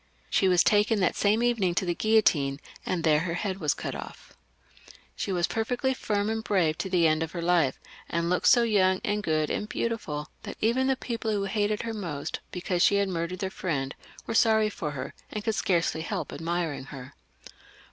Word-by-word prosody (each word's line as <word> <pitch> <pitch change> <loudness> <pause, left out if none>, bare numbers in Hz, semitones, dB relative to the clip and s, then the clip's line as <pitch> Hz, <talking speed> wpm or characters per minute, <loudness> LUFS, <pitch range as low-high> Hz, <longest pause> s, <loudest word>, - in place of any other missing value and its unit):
She 190 - +3
was 180 -1 +5
taken 210 0 +3
that 185 - +2
same 215 +3 +2
evening 210 -8 +1
to 185 - +1
the 175 - 0
guillotine, 165 -10 +2 0.3
and 175 -3 -1
there 155 -2 +4
her 170 +1 -2
head 190 +1 -3
was 150 -5 +1
cut - - -4
off. - - -9 0.8
She - - -3
was 175 -2 +2
perfectly 245 +5 -1
firm 205 -5 -1
and 220 0 -2
brave 175 -8 +2
to 190 - -2
the 180 -3 +3
end 155 0 +3
of 165 -1 -3
her 170 - -3
life, 170 -6 +2 0.3
and 170 0 0
looked 180 +1 +1
so 240 -1 +6
young 190 -4 +3
and 210 0 0
good 155 -4 0
and 210 - -2
beautiful 155 -11 -3
that - - -8
even 245 +4 +2
the 265 - +3
people 230 -3 -4
who 205 -2 0
hated 210 +2 0
her 230 -1 -3
most, 170 -9 -4
because 180 0 -2
she 200 - +5
had 200 -1 +2
murdered 170 0 -3
their 190 +1 -3
friend, 140 -9 -2 0.3
were - - -3
sorry 220 -1 +4
for 155 - -4
her, 135 -2 -6 0.2
and 210 - -4
could 220 - 0
scarcely 170 -5 +1
help 160 - -4
admiring 165 -3 -2
her. 135 -1 -10
185 Hz, 200 wpm, -27 LUFS, 165-215 Hz, 0.8 s, so